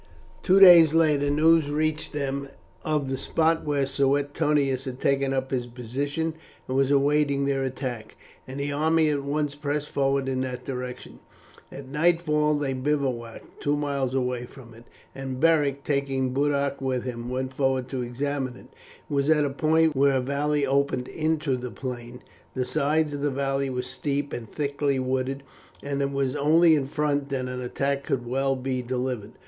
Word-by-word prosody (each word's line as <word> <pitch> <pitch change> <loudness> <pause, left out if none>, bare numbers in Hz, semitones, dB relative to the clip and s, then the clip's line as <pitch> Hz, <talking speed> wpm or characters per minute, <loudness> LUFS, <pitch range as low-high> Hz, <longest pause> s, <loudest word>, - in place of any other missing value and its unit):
Two 190 +2 +4
days 170 -5 +9
later, 150 -3 +3
news 155 +1 +4
reached 155 +1 -1
them 140 -1 -3 0.4
of 150 -3 0
the 135 0 -2
spot 160 +3 +1
where 145 -2 0
Suetonius 140 0 +1
had 130 -1 -6
taken 140 0 +1
up 135 0 -2
his 125 -2 -1
position 140 +7 -3 0.3
and 130 - -3
was 135 0 +3
awaiting 140 0 +2
their 135 -1 0
attack, 125 -4 -5 0.3
and 130 +2 -6
the 145 +1 -2
army 155 +2 +2
at 145 -1 0
once 145 +1 -1
pressed 145 0 -3
forward 135 -1 +1
in 130 -1 -1
that 125 -1 -5
direction. 125 -2 -6 0.5
At 140 -1 -9
nightfall 150 0 +2
they 145 -2 -1
bivouacked 130 -4 -3
two 145 0 +1
miles 140 -3 -1
away 125 -2 -1
from 120 -2 -14
it, 115 +1 -15 0.3
and 135 -1 -5
Beric, 145 -3 +2
taking 135 -3 -1
Boduoc 140 0 0
with 130 -2 -1
him, 120 -1 -5
went 130 +1 -3
forward 130 -1 0
to 130 -2 -3
examine 130 +1 -3
it. - - -15 0.4
It - - -7
was 140 +1 +1
at 150 -2 +4
a 140 - -2
point 160 +2 +2
where 135 0 +3
a - - +1
valley 140 +2 0
opened 140 -2 0
into 155 -3 0
the 125 0 -5
plain; 125 -1 -7 0.3
the 130 -1 -1
sides 150 +2 +1
of 145 - -4
the 145 - +1
valley 135 0 -1
were 125 -1 -3
steep 140 +2 -3
and 115 -2 -6
thickly 140 -1 -1
wooded, 130 +1 -2 0.4
and 140 0 -2
it 140 - 0
was 135 -1 -1
only 160 +3 +5
in 140 -3 +1
front 145 -1 -1
that 135 -2 -2
an 125 0 -5
attack 140 +3 -2
could 125 -4 -2
well 135 +2 0
be 130 0 -2
delivered. 125 -3 -3
140 Hz, 175 wpm, -25 LUFS, 130-145 Hz, 0.5 s, days